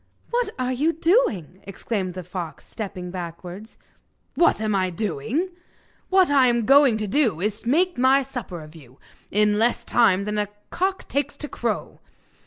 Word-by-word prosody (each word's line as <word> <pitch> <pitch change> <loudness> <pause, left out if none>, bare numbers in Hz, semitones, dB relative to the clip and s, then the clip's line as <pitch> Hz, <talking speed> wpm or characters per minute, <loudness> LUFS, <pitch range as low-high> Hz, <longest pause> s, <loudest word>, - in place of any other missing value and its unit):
'What 480 -2 +1
are 255 0 -1
you 300 +6 +1
doing?' 320 - +1
exclaimed 195 -1 -4
the 185 - -5
fox, 175 -3 -7
stepping 190 -5 -6
backwards. 180 +4 -8 0.6
'What 340 - +3
am 215 -1 0
I 185 -2 +1
doing? 215 - -2 0.6
What 375 -4 +4
I 270 -3 +5
am 235 -2 +1
going 275 -3 +6
to 215 -1 -3
do 220 - +1
is 210 +3 -2
to 235 - -4
make 350 +1 +2
my 265 +2 +5
supper 230 - -7
off 155 +1 -14
you, 130 -5 -15 0.3
in 210 0 +2
less 235 +2 +1
time 200 -5 +3
than 210 0 -1
a 205 - 0 0.2
cock 380 +1 -1
takes 285 0 -2
to 295 - -5
crow. - - -3
220 Hz, 170 wpm, -23 LUFS, 185-280 Hz, 0.6 s, going